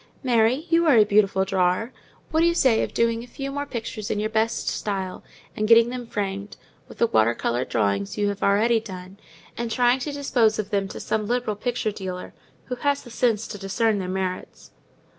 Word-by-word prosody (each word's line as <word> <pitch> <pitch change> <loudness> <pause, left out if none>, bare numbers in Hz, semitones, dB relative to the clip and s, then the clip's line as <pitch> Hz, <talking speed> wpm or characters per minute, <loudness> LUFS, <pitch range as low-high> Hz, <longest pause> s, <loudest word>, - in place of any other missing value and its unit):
Mary, 245 +4 +2
you 335 0 +4
are 280 -6 +6
a 215 - +8
beautiful 200 -2 +2
drawer. 190 +5 0 0.4
What 320 - +2
do 335 - +5
you 340 - +2
say 255 -8 +4
to - - -1
doing 230 0 +1
a - - -12
few 275 +2 -6
more 285 +1 -4
pictures 225 -4 -5
in 205 - -1
your 215 +1 -2
best 220 +1 0
style, 190 -3 -3 0.3
and 215 - -1
getting 230 +1 +6
them 245 -1 -6
framed, 200 -1 -4 0.3
with - - -13
the - - +3
water 115 - +2
coloured 120 +2 -2
drawings 100 -3 0
you 205 -1 +1
have 200 0 -5
already 225 +4 +3
done, 190 -2 -10 0.4
and 235 0 -3
trying 245 +2 +3
to 290 +3 -4
dispose 245 -6 +1
of 215 -1 -4
them 200 -1 0
to - - -8
some 215 -1 -2
liberal 240 -2 -1
picture 230 0 -2
dealer, 185 -3 -6 0.3
who 250 - -5
has 285 +2 0
the 240 - -12
sense 225 -2 +1
to 205 - -7
discern 205 +2 0
their 185 -1 -4
merits?" 185 -1 -4
220 Hz, 205 wpm, -24 LUFS, 195-245 Hz, 0.4 s, a